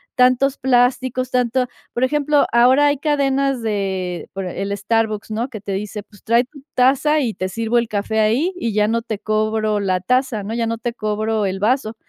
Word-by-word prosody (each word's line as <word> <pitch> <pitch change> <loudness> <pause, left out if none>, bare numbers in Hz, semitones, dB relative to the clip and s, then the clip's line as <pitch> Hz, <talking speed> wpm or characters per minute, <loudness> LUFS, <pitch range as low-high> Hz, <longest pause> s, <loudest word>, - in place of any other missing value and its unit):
tantos 255 +2 +3
plásticos, 255 0 +1
tanto, 250 0 +1 0.3
por 240 - -1
ejemplo, 295 +2 +2
ahora 255 +5 +5
hay 285 0 +2
cadenas 275 -3 +1
de 190 -4 -3
por 195 -1 -4
el 195 +2 -3
Starbucks, 215 +1 -1
¿no? 230 +4 -2
Que 220 -5 -8
te 200 - -6
dice, 205 +2 -4
pues, 205 0 -20
trae 235 +2 +3
tu 270 +3 -15
taza, 275 +4 +3
y 235 -5 -1
te 185 - -2
sirvo 230 +3 -1
el 235 - -2
café 215 +1 -2
ahí, 235 - +2
y 235 -11 -2
ya 210 0 +2
no 230 +1 0
te 220 -2 -4
cobro 215 0 0
la 185 -2 0
taza, 250 +2 0
¿no? 210 +3 -5
Ya 230 0 -1
no 230 0 -2
te 235 +1 -4
cobro 215 -1 -1
el 190 0 -3
vaso. 225 +1 0
230 Hz, 200 wpm, -20 LUFS, 210-255 Hz, 0.3 s, ahora